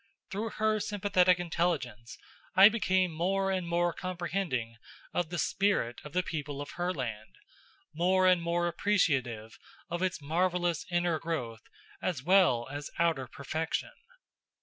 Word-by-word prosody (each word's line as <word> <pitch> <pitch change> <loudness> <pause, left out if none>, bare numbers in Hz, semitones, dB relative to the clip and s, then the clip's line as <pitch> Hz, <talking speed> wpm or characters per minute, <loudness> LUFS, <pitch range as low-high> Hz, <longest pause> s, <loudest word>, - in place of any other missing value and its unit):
Through 210 +3 -2
her 215 0 +2
sympathetic 185 -3 +2
intelligence 160 -10 -2 0.4
I 195 +2 +10
became 190 -5 +1
more 195 +4 0
and 185 -2 -1
more 170 0 +1
comprehending 170 -11 -3 0.4
of 175 -3 -1
the 175 - -4
spirit 195 -10 0
of 150 - -10
the 180 +1 +1
people 145 -4 -4
of 145 - -6
Herland, 130 -12 -4 0.6
more 185 +3 +3
and 180 -2 +5
more 170 +1 0
appreciative 135 - 0 0.3
of 175 +1 -2
its 185 -2 0
marvelous 175 +2 0
inner 175 -2 +1
growth 125 -9 -4 0.4
as 150 -9 -2
well 175 -9 +4
as 145 0 -5
outer 165 -6 +1
perfection. 155 +6 -3
175 Hz, 130 wpm, -30 LUFS, 145-185 Hz, 0.6 s, I